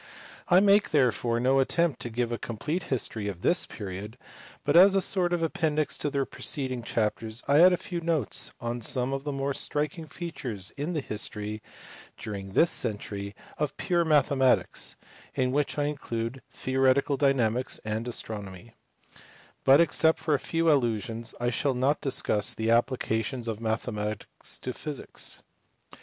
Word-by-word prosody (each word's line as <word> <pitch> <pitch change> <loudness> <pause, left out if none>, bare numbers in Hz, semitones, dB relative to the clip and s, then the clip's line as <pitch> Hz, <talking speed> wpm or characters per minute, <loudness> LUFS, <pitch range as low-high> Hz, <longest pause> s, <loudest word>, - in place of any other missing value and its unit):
I 180 0 +6
make 205 +1 +4
therefore 120 -4 +2
no 130 +2 +3
attempt 165 +3 +1
to 120 - -4
give 120 +1 -1
a 120 - -2
complete 145 - -3
history 110 -5 -2
of 95 -3 -6
this 175 - +2
period, 105 +2 -7 0.5
but 145 - +1
as 190 +3 +8
a - - +5
sort 180 -2 +2
of 175 -1 0
appendix 155 -2 0
to 145 - 0
the 140 -1 0
preceding 130 -5 -2
chapters 110 0 -2
I 140 +2 +5
add 180 +1 +8
a 180 - +2
few 170 -1 -5
notes 160 - 0
on 120 +1 -3
some 125 +3 0
of 135 +1 -4
the 145 - -1
more 140 0 -1
striking 150 +4 -2
features 135 - -5
in 150 +5 -4
the 155 - -1
history, 105 -2 -4 0.6
during 95 -2 -6
this 165 - +4
century, 100 -1 -2 0.2
of 150 -2 -2
pure 175 -2 +1
mathe 150 -3 +3
matics 130 -1 +1 0.4
(in 130 -1 +1
which 145 +2 0
I 145 - +1
include 130 -4 -3
theoretical 130 +2 +2
dynamics 130 -3 +1
and 110 +2 -2
astronomy); 105 -2 -6 0.9
but 135 +1 +7
except 160 -1 +4
for 155 - -1
a 145 - +2
few 165 +2 +1
allusions 115 -4 -1
I 120 0 0
shall 135 +2 0
not 135 +4 +1
discuss 110 -6 0
the 110 0 -1
applica 115 -1 +2
tion 120 0 -5
of 110 -1 -3
mathematics 110 -1 -3
to 125 - -4
physics. 150 0 -4
130 Hz, 160 wpm, -28 LUFS, 110-150 Hz, 0.9 s, as